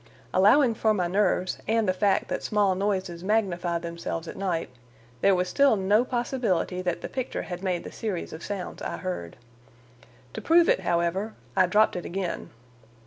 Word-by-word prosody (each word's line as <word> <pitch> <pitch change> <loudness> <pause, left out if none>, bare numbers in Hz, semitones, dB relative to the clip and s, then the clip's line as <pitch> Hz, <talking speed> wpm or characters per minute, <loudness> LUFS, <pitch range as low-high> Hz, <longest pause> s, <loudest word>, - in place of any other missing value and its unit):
Allowing 225 +7 +5
for 215 -1 +1
my 180 -3 0
nerves 185 0 +1
and 225 -1 +2
the 185 - +3
fact 195 +1 +1
that - - -3
small 205 -3 +2
noises 185 -3 -2
magnify 185 -5 0
themselves 170 0 -5
at - - -7
night, 175 -7 -2 0.5
there 195 -1 +5
was 180 0 0
still 280 +4 +4
no 205 +3 +3
possibility 240 -8 -1
that 180 -2 -2
the - - -4
picture 260 -1 -4
had 175 0 -6
made 185 -3 -1
the - - -8
series 205 -6 -4
of 160 - -8
sounds 200 -3 -5
I - - -4
heard. 180 - -5 1.0
To - - -5
prove 335 +1 +5
it, - - +4
however, 170 +6 -1 0.2
I 185 -2 +4
dropped 210 +4 +3
it 180 - -4
again. 185 -1 -4
190 Hz, 175 wpm, -26 LUFS, 175-215 Hz, 1.0 s, Allowing